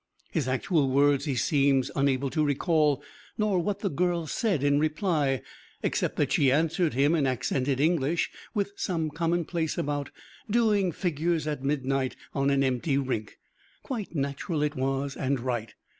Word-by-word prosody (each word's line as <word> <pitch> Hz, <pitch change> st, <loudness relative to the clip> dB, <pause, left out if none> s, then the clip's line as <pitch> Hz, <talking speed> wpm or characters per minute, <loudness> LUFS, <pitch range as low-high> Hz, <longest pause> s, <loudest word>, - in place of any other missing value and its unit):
His 155 Hz, -7 st, -1 dB
actual 140 Hz, +2 st, +1 dB
words 140 Hz, +1 st, +3 dB
he 140 Hz, -4 st, -1 dB
seems 135 Hz, 0 st, +2 dB
unable 135 Hz, -1 st, +1 dB
to 155 Hz, -, +1 dB
recall, 150 Hz, 0 st, +2 dB, 0.3 s
nor 210 Hz, -4 st, +2 dB
what 205 Hz, +3 st, -2 dB
the 200 Hz, -, 0 dB
girl 175 Hz, +1 st, 0 dB
said 185 Hz, -, 0 dB
in 145 Hz, 0 st, +3 dB
reply, 155 Hz, -, 0 dB, 0.4 s
except -, -, 0 dB
that -, -, 0 dB
she 135 Hz, -2 st, +4 dB
answered 160 Hz, +2 st, +1 dB
him 140 Hz, +4 st, +3 dB
in 150 Hz, -5 st, +2 dB
accented 130 Hz, +1 st, 0 dB
English 160 Hz, +1 st, +1 dB, 0.2 s
with 200 Hz, -1 st, -1 dB
some 165 Hz, -7 st, -2 dB
commonplace 165 Hz, 0 st, -1 dB
about 145 Hz, -1 st, -2 dB, 0.4 s
doing 210 Hz, -4 st, +3 dB
figures 165 Hz, -1 st, -1 dB
at 150 Hz, -3 st, -3 dB
midnight 135 Hz, -2 st, 0 dB, 0.2 s
on 140 Hz, 0 st, +1 dB
an 140 Hz, 0 st, +3 dB
empty 135 Hz, +2 st, +1 dB
rink. 130 Hz, -6 st, -3 dB, 0.5 s
Quite 220 Hz, -9 st, -5 dB
natural 145 Hz, +3 st, -1 dB
it 150 Hz, 0 st, -1 dB
was, 135 Hz, +1 st, -1 dB
and 135 Hz, 0 st, -1 dB
right. 120 Hz, -3 st, -3 dB
145 Hz, 155 wpm, -27 LUFS, 135-170 Hz, 0.5 s, she